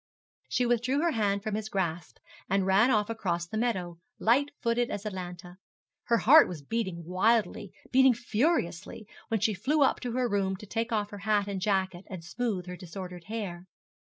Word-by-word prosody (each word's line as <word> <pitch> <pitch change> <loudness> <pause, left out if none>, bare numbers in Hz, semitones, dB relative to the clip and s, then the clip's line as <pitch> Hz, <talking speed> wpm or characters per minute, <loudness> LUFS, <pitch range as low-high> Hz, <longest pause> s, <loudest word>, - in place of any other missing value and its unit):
She 250 - +1
withdrew 245 +4 +1
her 340 - +2
hand 200 -4 0
from 215 -2 -3
his 215 +1 -3
grasp, 175 -4 -3 0.3
and 195 0 +2
ran 195 +6 +4
off 210 -4 +2
across 185 -7 -2
the 195 - -8
meadow, 185 -7 -1 0.2
light 270 +6 +3
footed 240 0 0
as 205 +1 -5
Atalanta. 180 -2 -7 0.5
Her 235 - +3
heart 295 +7 +7
was 155 -5 -7
beating 185 -2 -3
wildly, 205 +2 +1 0.2
beating 265 -1 +6
furiously, 225 - -1 0.2
when 225 -3 -1
she 220 0 +2
flew 280 +10 +2
up 270 - +2
to 245 -2 -4
her 250 0 +1
room 195 -3 0
to 200 - -11
take 225 +3 -2
off 210 -2 -1
her 205 - -7
hat 205 0 +1
and 195 -2 -4
jacket 190 -2 0
and 180 -4 -7
smooth 205 -1 -2
her 180 0 -6
disordered 180 0 -8
hair. 190 -5 -5
205 Hz, 185 wpm, -29 LUFS, 185-235 Hz, 0.5 s, heart